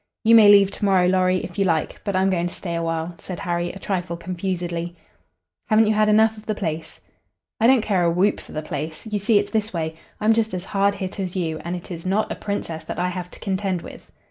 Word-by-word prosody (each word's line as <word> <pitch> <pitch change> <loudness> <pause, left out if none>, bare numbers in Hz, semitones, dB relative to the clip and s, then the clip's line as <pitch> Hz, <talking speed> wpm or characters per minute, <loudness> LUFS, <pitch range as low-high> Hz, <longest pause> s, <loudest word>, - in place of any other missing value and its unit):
"You 230 0 +5
may 220 -3 +9
leave 200 -1 +7
to - - -7
morrow, 190 -2 +4
Lorry, 185 0 +2
if 180 - -7
you 195 - +3
like, 165 -4 -1
but 200 -2 -2
I'm 190 +1 +3
going 175 -1 0
to 175 - -7
stay 170 -3 -5
a 170 - -1
while," 165 +1 -2
said 180 -2 -7
Harry, 175 -1 -1
a - - -10
trifle 180 -3 -3
confusedly. 175 -1 -4 0.7
"Haven't 220 0 +5
you 215 - +2
had 215 0 +3
enough 220 +1 +4
of 215 - -18
the 215 - -1
place?" 160 -4 -4 0.6
"I 230 - +4
don't 255 -3 +5
care 195 -5 +1
a 170 - +3
whoop 180 +5 +2
for - - -12
the 155 - -4
place. 155 +3 -5
You 210 -2 -2
see, 210 +2 +3
it's - - 0
this 220 -2 -1
way: 160 -2 -2 0.3
I'm 215 +1 +4
just 220 -3 0
as 180 +1 -5
hard 200 0 +1
hit 190 +1 -5
as 185 -1 -3
you, 160 -4 -2
and 175 +1 -4
it 175 +1 -9
is 165 -1 -6
not 195 +3 0
a - - -2
Princess 170 -6 -4
that - - -5
I 180 +1 0
have 180 -1 -5
to - - -11
contend 190 -3 -2
with." - - -12
185 Hz, 250 wpm, -23 LUFS, 170-205 Hz, 0.7 s, may